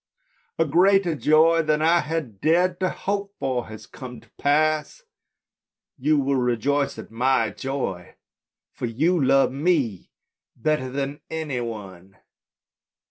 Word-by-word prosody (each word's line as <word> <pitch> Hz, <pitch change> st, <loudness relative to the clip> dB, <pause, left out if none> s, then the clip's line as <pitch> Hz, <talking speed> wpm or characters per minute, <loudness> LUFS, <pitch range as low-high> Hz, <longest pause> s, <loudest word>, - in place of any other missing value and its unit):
" -, -, -39 dB
A 165 Hz, -, +3 dB
greater 180 Hz, +3 st, +3 dB
joy 160 Hz, +2 st, +4 dB
than 155 Hz, -1 st, +1 dB
I 170 Hz, +2 st, +4 dB
had 150 Hz, -, -4 dB
dared 175 Hz, +3 st, +2 dB
to 185 Hz, -1 st, +1 dB
hope 200 Hz, 0 st, -3 dB
for 130 Hz, -2 st, -2 dB
has 110 Hz, -1 st, -10 dB
come 125 Hz, -2 st, -10 dB
to -, -, -25 dB
pass. 155 Hz, -, 0 dB, 0.9 s
You 150 Hz, +3 st, +1 dB
will 140 Hz, -1 st, +1 dB
rejoice 130 Hz, +3 st, 0 dB
at -, -, -10 dB
my 130 Hz, +4 st, +1 dB
joy, 130 Hz, -10 st, -4 dB, 0.6 s
for 120 Hz, -, -4 dB
you 155 Hz, +8 st, +1 dB
love 135 Hz, 0 st, +4 dB
me 135 Hz, -, 0 dB, 0.5 s
better 140 Hz, 0 st, -1 dB
than 140 Hz, +2 st, -4 dB
any 155 Hz, -6 st, -3 dB
one." 95 Hz, -5 st, -8 dB
145 Hz, 135 wpm, -24 LUFS, 125-165 Hz, 0.9 s, joy